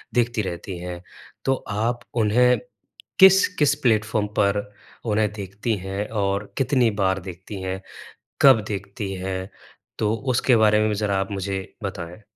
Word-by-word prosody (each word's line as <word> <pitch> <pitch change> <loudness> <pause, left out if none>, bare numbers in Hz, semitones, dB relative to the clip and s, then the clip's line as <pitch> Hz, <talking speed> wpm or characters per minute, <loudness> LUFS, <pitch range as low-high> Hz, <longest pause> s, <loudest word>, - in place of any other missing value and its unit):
देखती 120 -1 +2
रहती 90 0 -5
हैं 90 0 -6 0.4
तो 135 - +3 0.2
आप 115 +4 -1 0.2
उन्हें 125 +4 +4 0.6
किस-किस 190 -6 +6
प्लेटफ़ॉर्म 110 -2 +2
पर 100 0 +2 0.4
उन्हें 105 -1 +1
देखती 100 +3 -3
हैं 95 +2 -4 0.2
और 100 +1 -1
कितनी 130 -3 +3
बार 95 0 +2
देखती 95 +3 -8
हैं? 95 +1 -4 0.6
कब 130 -5 +7
देखती 100 0 -4
हैं? 95 +1 -4 0.5
तो 110 0 +1 0.2
उसके 120 +1 +3
बारे 105 -1 +4
में 110 0 +2
भी 105 - 0
ज़रा 100 -1 0
आप 95 +1 -3
मुझे 95 0 -2 0.2
बताएँ। 90 0 -6
105 Hz, 140 wpm, -23 LUFS, 95-115 Hz, 0.6 s, कब